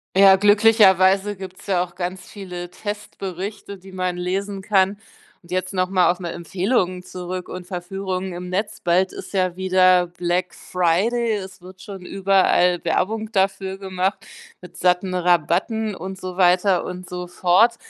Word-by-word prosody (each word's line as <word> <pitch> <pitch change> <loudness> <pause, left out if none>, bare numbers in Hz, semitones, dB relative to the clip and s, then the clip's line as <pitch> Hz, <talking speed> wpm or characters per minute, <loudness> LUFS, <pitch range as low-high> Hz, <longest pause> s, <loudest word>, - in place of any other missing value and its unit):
Ja, 195 0 +8
glücklicherweise 205 -1 +4
gibt's 185 0 -10
ja 180 -3 +2
auch 175 -1 -10
ganz 185 +1 -4
viele 180 -3 -8
Testberichte, 200 -1 -6
die 190 +1 -14
man 185 -1 -2
lesen 195 +2 -3
kann. 195 0 +2 0.5
Und 170 - -17
jetzt 185 +2 -2
noch 185 0 +1
mal 185 -2 +3
auf 180 +1 0
'ne 175 -2 -5
Empfehlung 180 +1 -1
zurück 180 0 -6
und 185 -1 -7
Verführungen 185 0 -4
im 180 +1 -7
Netz. 205 +3 -3
Bald 180 +2 +2
ist - - -9
ja 185 -2 0
wieder 185 -1 +4
Black 175 +1 -2
Friday. 205 +7 0
Es 190 -2 -8
wird 185 +1 -13
schon 195 -2 -9
überall 190 -2 +2
Werbung 215 +6 -1
dafür 195 -1 0
gemacht 190 0 -2 0.4
mit 180 - -13
satten 180 +1 +1
Rabatten 180 +5 +1
und 190 +1 -7
so 185 -1 -6
weiter 180 0 +3
und 180 0 -7
so 180 0 -6
fort. 185 +6 +3
185 Hz, 155 wpm, -22 LUFS, 180-195 Hz, 0.5 s, Ja